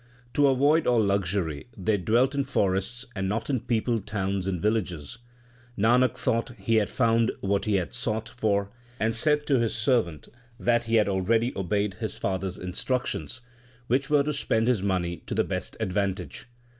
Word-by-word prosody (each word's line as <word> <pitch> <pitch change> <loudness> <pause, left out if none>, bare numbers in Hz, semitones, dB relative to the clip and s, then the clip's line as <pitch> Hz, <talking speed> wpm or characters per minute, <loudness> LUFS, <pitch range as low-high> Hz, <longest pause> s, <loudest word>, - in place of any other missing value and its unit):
To 145 -1 +4
avoid 145 +4 +3
all 120 -2 +4
luxury 95 -6 -1
they 100 +2 +1
dwelt 120 +8 +2
in 140 0 +1
forests, 120 -1 -1
and 95 -1 -1
not 115 +6 -2
in 130 - +1
peopled 115 -2 -1
towns 95 -2 -2
and 90 -3 -1
villages. 90 -7 -2 0.6
Nanak 125 +4 +3
thought 120 0 -1
he 115 -1 +1
had 105 -2 +2
found 115 -2 +2
what 100 0 0
he 105 -2 +1
had 90 -3 -1
sought 115 -2 -2
for, 100 -5 -1 0.3
and 110 +1 +1
said 150 +4 +2
to 135 -3 +3
his 115 -1 0
servant 110 - +1 0.3
that 120 0 +2
he 115 +1 +1
had 105 -2 +4
already 110 +5 +1
obeyed 100 +1 0
his 110 - -3
father 95 0 -1
s 90 - -6
instructions, 120 +7 -2 0.4
which 135 +4 0
were 145 -1 +4
to 150 +1 -1
spend 115 -5 +1
his 125 -6 +2
money 90 -3 -1
to - - -3
the - - +3
best - - -4
advantage. 100 -1 -2
110 Hz, 175 wpm, -27 LUFS, 95-120 Hz, 0.6 s, To